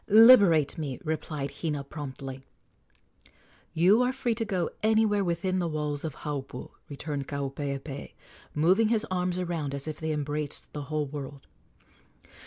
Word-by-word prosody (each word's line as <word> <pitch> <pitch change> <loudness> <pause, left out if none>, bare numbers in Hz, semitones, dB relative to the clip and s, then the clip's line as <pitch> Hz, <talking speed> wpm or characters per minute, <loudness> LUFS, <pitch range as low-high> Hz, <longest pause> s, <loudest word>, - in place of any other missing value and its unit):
"Liberate 205 - +7
me," 140 -5 -4
replied 155 -2 -3
Hina 150 -4 -1
promptly. 135 -2 -7 1.3
"You 185 +8 +5
are 250 0 +2
free 260 -3 -1
to 225 +1 -2
go 185 -6 -1
anywhere 215 -2 +3
within 185 +1 0
the 175 - 0
walls 150 -2 -2
of 155 -4 -4
Haupu," 135 -4 -5 0.2
returned 145 -1 -4
Kaupeepee, 140 0 -4 0.4
moving 185 +9 +4
his 220 -1 +2
arms 180 -1 0
around 165 -6 -2
as 140 +2 -6
if 155 - -5
they 160 0 -2
embraced 150 0 -3
the 145 -1 -5
whole 155 -1 0
world. 140 -1 -7
155 Hz, 140 wpm, -28 LUFS, 140-185 Hz, 1.3 s, Liberate